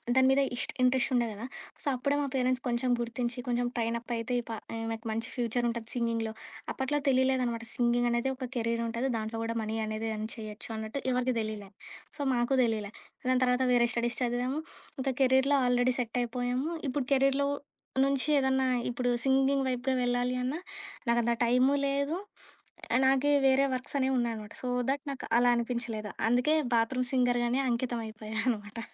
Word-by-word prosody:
దాని 260 0 +6
మీద 270 +1 +4
ఇస్ట్ 245 - -1
ఇంట్రెస్టుండేది 250 -2 +2
గదా! 225 - -6 0.4
సో, - - -8
అప్పుడే 280 +3 0
మా 280 - -1
పేరెంట్స్ 255 0 +1
కొంచెం 240 +1 0
గుర్తించి, 240 +1 -2
కొంచెం 245 0 +1
ట్రైన్ 230 -1 0
అప్ 240 +1 -11
అయితే 230 +2 -3
ఈ - - -2
ప - - -3 0.2
ఈమెకు 225 0 -4
మంచి 225 +2 -2
ఫ్యూచరుంటది 235 -1 -1
సింగింగ్‌లో. 230 -2 0 0.4
అప్పట్లో 265 +2 -1
తెలియలేదనమాట. 255 -3 +2
సింగింగనేది 240 +1 +2
ఒక 255 -1 -5
కెరీరుంటది 230 +2 -1
దాంట్లో 220 +1 -4
కూడా 230 0 -2
మనీ 220 0 -3
అనేది 215 +1 -3
ఎర్న్ 215 0 -3
చేయొచ్చు 215 -1 -7
అన్నట్టు 220 +5 -4
ఎవరికీ 250 0 +1
తెలీలే. 215 -2 -4 0.5
సో, 290 - -5
మాకు 240 +2 +1
తెలియలే. 215 -3 -1 0.4
దాని 255 0 +3
తర్వాత 250 +1 +2
వేరే 240 -1 +4
స్టడీస్ 235 0 -1
చదివాము, 250 +4 0 0.4
ఇంకా 265 0 0
కెరీర్‌లో 265 +2 +4
ఆల్రెడీ 245 +1 +3
సెట్టైపోయాము. 245 +4 -1 0.2
ఇప్పుడు 270 0 -1
కెరీర్‌లో 275 +1 +3 0.6
నుంచి 275 0 +1
ఏదన్నా 265 -1 +2 0.2
ఇప్పుడు 245 +1 -1 0.2
సింగింగ్ 270 0 +3
వైపుగా 255 +1 0
వెళ్ళాలి 245 +1 +1
అన్నా, 290 +7 -2 0.5
నాకు 235 - +4
అంత 235 - +2
టైము 250 +3 +4
లేదు, 280 +4 0 0.9
నాకే 270 +2 +4
వేరే 270 +1 +5
వర్క్సనేవి 260 +1 -1
ఉన్నాయనమాట. 225 -3 -3
సో, 255 - -4 0.2
థట్ 280 +1 0
నాకు 270 - -6
అలా 245 0 +5
అనిపించలేదు. 235 -3 -3 0.2
అందుకే 250 +6 +3 0.2
బాత్‌రూమ్‌ 250 +2 +1
సింగర్‌గానే 245 0 +2
అంకితం 240 0 -1
అయిపోయాననమాట. 220 0 -3
245 Hz, 155 wpm, -30 LUFS, 230-260 Hz, 0.9 s, దాని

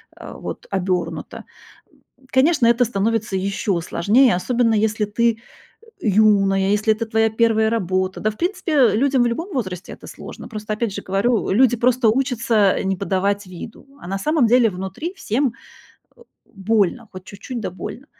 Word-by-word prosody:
э, - - -10
вот, - - -8
обёрнута. 185 -2 -3 0.9
Конечно, 260 -1 +3
это 235 +1 +4
становится 220 -1 -1
ещё 195 -1 -1
сложнее, 210 +8 +3
особенно 235 +4 +1
если 215 0 +1
ты, 230 +2 0 0.6
э, - - -2
юная, 195 -2 +3
если 210 +1 +2
это 225 +2 -4
твоя 225 0 +1
1 220 -1 +2
работа. 185 -3 -1
Да, 215 - 0
в 215 - -16
принципе, 350 -1 -2
э, 255 -7 +4
людям 265 +1 +2
в - - +2
любом 330 +11 -4
возрасте 185 -8 -4
это - - -13
сложно. - - -10
Просто, 215 -1 -5
опять 215 -1 -2
же - - -5
говорю, 205 +5 0
люди 240 +3 +4
просто 245 0 +3
учатся, 230 -5 +2
э, - - -2
не 190 -1 -1
подавать 200 +1 -1
виду, 185 +8 -10
а - - -10
на 195 +1 -2
самом 300 -2 +2
деле 240 -1 +4
внутри 190 - -6
всем, 255 - -1 0.6
э, - - -22 0.3
больно, 210 +3 -1
хоть 185 -1 -10
чуть-чуть, 230 +5 -7
да 195 - -4
больно. 240 - -8
220 Hz, 170 wpm, -20 LUFS, 195-240 Hz, 0.9 s, это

